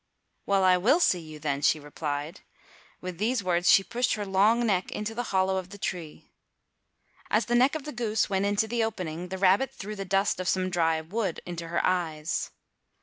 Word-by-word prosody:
"Well, 195 Hz, -1 st, +3 dB
I 185 Hz, -1 st, +5 dB
will 245 Hz, -, +3 dB
see 185 Hz, -, +3 dB
you 155 Hz, -2 st, -10 dB
then," 145 Hz, -2 st, -2 dB
she 155 Hz, -, +3 dB
replied. 145 Hz, +3 st, -5 dB, 0.6 s
With 180 Hz, -2 st, -6 dB
these 225 Hz, +1 st, 0 dB
words 175 Hz, -1 st, +1 dB
she 195 Hz, -, +6 dB
pushed 240 Hz, +4 st, 0 dB
her 210 Hz, -1 st, -4 dB
long 210 Hz, +5 st, +3 dB
neck 190 Hz, -4 st, 0 dB
into 210 Hz, +1 st, -4 dB
the 240 Hz, -, -2 dB
hollow 190 Hz, 0 st, +1 dB
of 185 Hz, -1 st, -5 dB
the 200 Hz, -, -10 dB
tree. 175 Hz, -5 st, -6 dB, 1.0 s
As -, -, +2 dB
the 240 Hz, -, -2 dB
neck 255 Hz, +5 st, +4 dB
of 310 Hz, -, -4 dB
the 300 Hz, -, -5 dB
goose 220 Hz, -3 st, 0 dB
went 195 Hz, 0 st, 0 dB
into 205 Hz, +2 st, +1 dB
the 235 Hz, 0 st, 0 dB
opening 180 Hz, -6 st, -4 dB
the 190 Hz, +1 st, -5 dB
rabbit 195 Hz, +7 st, +3 dB
threw 210 Hz, +1 st, -7 dB
the 195 Hz, -, -4 dB
dust 195 Hz, 0 st, +1 dB
of 185 Hz, -, -1 dB
some 185 Hz, 0 st, 0 dB
dry 165 Hz, -2 st, +1 dB
wood 190 Hz, +2 st, -3 dB
into 170 Hz, -1 st, -6 dB
her 170 Hz, -, 0 dB
eyes. 165 Hz, -3 st, -1 dB
190 Hz, 205 wpm, -27 LUFS, 170-215 Hz, 1.0 s, she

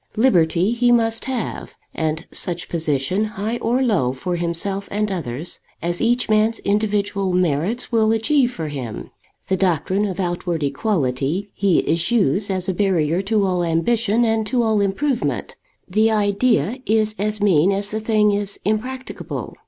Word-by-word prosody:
Liberty 185 Hz, -5 st, +3 dB
he 240 Hz, +1 st, +2 dB
must 225 Hz, -1 st, +2 dB
have, 255 Hz, -6 st, -4 dB, 0.2 s
and 160 Hz, +1 st, -2 dB
such 175 Hz, -1 st, -2 dB
position, 160 Hz, +3 st, 0 dB
high 215 Hz, +2 st, -3 dB
or 240 Hz, +3 st, 0 dB
low, 170 Hz, -, +1 dB
for 175 Hz, +7 st, -3 dB
himself 175 Hz, +4 st, -2 dB
and 210 Hz, 0 st, -1 dB
others, 155 Hz, -3 st, -4 dB, 0.2 s
as 175 Hz, +1 st, -2 dB
each 240 Hz, +1 st, +2 dB
man's 215 Hz, +1 st, +2 dB
individual 200 Hz, -2 st, 0 dB
merits 180 Hz, -, 0 dB
will 220 Hz, -2 st, +3 dB
achieve 245 Hz, +4 st, +2 dB
for 165 Hz, -10 st, -5 dB
him. 125 Hz, -7 st, -6 dB, 0.4 s
The 190 Hz, -, +1 dB
doctrine 185 Hz, +2 st, +1 dB
of 190 Hz, -2 st, -4 dB
outward 175 Hz, -3 st, -2 dB
equality 145 Hz, -, -1 dB
he 195 Hz, -3 st, +1 dB
eschews 185 Hz, -, +1 dB
as 185 Hz, -2 st, -1 dB
a 190 Hz, -, 0 dB
barrier 175 Hz, -3 st, +1 dB
to 205 Hz, 0 st, +1 dB
all 180 Hz, -2 st, 0 dB
ambition, 215 Hz, +7 st, +1 dB
and 225 Hz, -1 st, +1 dB
to 245 Hz, +1 st, +1 dB
all 220 Hz, -2 st, +2 dB
improvement. 240 Hz, +7 st, -1 dB, 0.3 s
The 215 Hz, +4 st, +2 dB
idea 220 Hz, +3 st, +1 dB
is 215 Hz, 0 st, +2 dB
as 210 Hz, +1 st, -1 dB
mean 190 Hz, -3 st, +4 dB
as 200 Hz, +1 st, -1 dB
the 215 Hz, -, -2 dB
thing 215 Hz, -1 st, +2 dB
is 200 Hz, 0 st, -2 dB
impracticable. 250 Hz, +5 st, -4 dB
200 Hz, 150 wpm, -21 LUFS, 175-220 Hz, 0.4 s, mean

